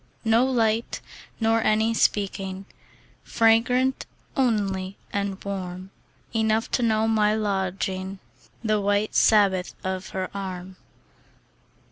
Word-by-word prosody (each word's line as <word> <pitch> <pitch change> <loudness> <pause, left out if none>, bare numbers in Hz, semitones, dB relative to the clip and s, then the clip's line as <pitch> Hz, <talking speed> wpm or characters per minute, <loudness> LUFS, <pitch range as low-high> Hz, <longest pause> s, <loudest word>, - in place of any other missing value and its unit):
No 225 +2 +4
light, 230 -3 0 0.4
nor 225 0 +2
any 220 +1 +2
speaking; 195 -3 0 0.6
Fragrant 240 +3 +2 0.3
only 200 -7 0 0.2
and 200 -1 -1
warm. 185 -1 -5 0.4
Enough 220 0 +1
to - - +1
know 220 -1 +2
my 215 -1 +3
lodging, 190 -2 -2 0.5
The 215 -2 +1
white 205 +1 +1
Sabbath 195 -4 +3
of 190 0 -3
her 185 -1 -4
arm. 185 -1 -6
205 Hz, 100 wpm, -25 LUFS, 190-225 Hz, 0.6 s, No